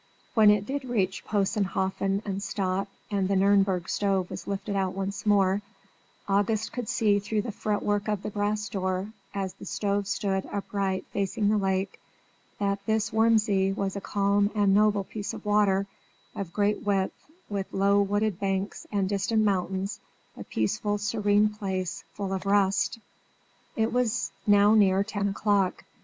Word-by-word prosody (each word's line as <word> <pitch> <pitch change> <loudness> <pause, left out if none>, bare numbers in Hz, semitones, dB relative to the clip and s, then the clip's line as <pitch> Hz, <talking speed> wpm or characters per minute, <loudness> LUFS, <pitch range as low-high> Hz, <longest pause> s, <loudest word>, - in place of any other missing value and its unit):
When 215 -2 +6
it 210 -1 +3
did 275 +4 -3
reach 200 -7 -1
Possenhofen 195 -1 0
and 195 -1 -3
stop, 195 -1 -1 0.2
and 195 -2 +1
the 195 - +1
Nürnberg 195 -2 +3
stove 195 -3 0
was - - -7
lifted 200 +1 -3
out 190 -1 0
once 195 +2 -4
more, 200 -1 +3 0.7
August 205 +2 +1
could 245 -4 -4
see 205 -2 +3
through 210 +1 -1
the 230 - -4
fretwork 205 0 -1
of 210 -2 -1
the 210 - -4
brass 210 +1 -1
door, 190 0 -2 0.2
as 195 -2 -2
the - - -12
stove 200 -1 -1
stood 195 -2 -1
upright 195 -2 -2
facing 200 +1 0
the 215 - +3
lake, 190 0 -1 0.6
that 200 0 -1
this 220 0 +1
Wurm 225 +1 +5
See 195 -3 +1
was 195 0 -2
a 200 - -4
calm 200 0 +1
and 205 -2 +3
noble 205 -1 +3
piece 205 +1 -5
of - - -10
water, 205 -2 +3 0.5
of 190 -4 -5
great 205 +2 +1
width, 195 -2 +1 0.3
with 200 -2 -4
low 200 +1 +3
wooded 205 -1 0
banks 195 0 -2
and 200 -2 +1
distant 210 +3 +1
mountains, 190 0 -1 0.4
a - - -8
peaceful, 205 - -1
serene 205 0 +2
place, 195 -3 -4
full 195 -1 -3
of 190 +1 -3
rest. 200 +1 +2 0.8
It 225 +1 0
was 245 -3 0 0.2
now 205 +1 +6
near 195 -2 +4
ten 200 -1 -2
o'clock. 200 -2 +1
200 Hz, 160 wpm, -27 LUFS, 195-210 Hz, 0.8 s, When